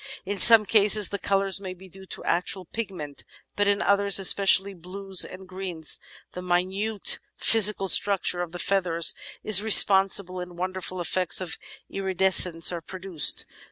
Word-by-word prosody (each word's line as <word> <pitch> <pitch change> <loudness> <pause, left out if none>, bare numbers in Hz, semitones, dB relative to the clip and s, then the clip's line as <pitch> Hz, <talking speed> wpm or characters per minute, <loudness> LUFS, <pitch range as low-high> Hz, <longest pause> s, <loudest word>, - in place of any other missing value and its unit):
In 200 +1 -5
some 225 0 +7
cases 210 -1 +3
the 200 - -7
colours 195 -1 -3
may 185 -2 -9
be 190 +1 -17
due 190 +1 -15
to - - -10
actual 180 +2 -3
pigment; 175 -9 -9 0.3
but 205 0 -2
in 200 0 -1
others, 200 0 0
especially 195 0 +2
blues 190 +2 -3
and 185 0 -13
greens, 180 -4 -4 0.3
the 180 - -10
minute 190 +4 -1 0.2
physical 210 -3 +4
structure 190 -2 +2
of 175 -2 -8
the 175 - -10
feathers 175 -3 0 0.3
is 205 -2 +4
responsible 195 -3 +3
and 180 -1 -11
wonderful 185 0 -7
effects 180 0 -1
of 180 -3 -7 0.3
iridescence 190 -3 +1
are 170 -1 -7
produced. 185 -2 -1
190 Hz, 150 wpm, -22 LUFS, 180-200 Hz, 0.3 s, some